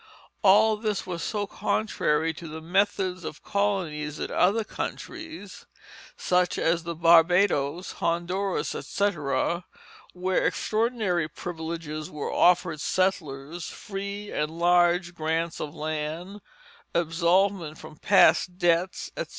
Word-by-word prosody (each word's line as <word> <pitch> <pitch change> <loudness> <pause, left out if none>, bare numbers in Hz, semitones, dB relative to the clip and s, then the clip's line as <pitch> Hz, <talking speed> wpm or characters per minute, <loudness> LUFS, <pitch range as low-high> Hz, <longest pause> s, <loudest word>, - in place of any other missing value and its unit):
All 210 +2 +5
this 210 -2 -2
was 175 -3 -5
so 205 +1 -2
contrary 165 -7 0
to 165 +2 -9
the 160 +1 -7
methods 185 +1 0
of 155 - -7
colonies 185 -8 -1
in - - -4
other 205 +5 +3
countries, 320 - -7 0.5
such 180 0 +1
as 170 +1 +1
the 170 0 -5
Barbadoes, 170 -1 +4
Honduras, 180 +3 -1
etc., 170 -3 -1 0.5
where 185 +1 0
extraordinary 215 -7 0
privileges 160 -2 -6
were 150 -1 -4
offered 175 -3 +3
settlers, 165 -4 -1
free 200 +1 -6
and 150 - -1
large 175 +1 +2
grants 165 0 -2
of 145 - -5
land, 155 +6 -4 0.5
absolvment 170 0 +1
from 155 0 -11
past 185 -2 +4
debts, 175 0 +1
etc. - - -3
175 Hz, 110 wpm, -26 LUFS, 160-195 Hz, 0.5 s, All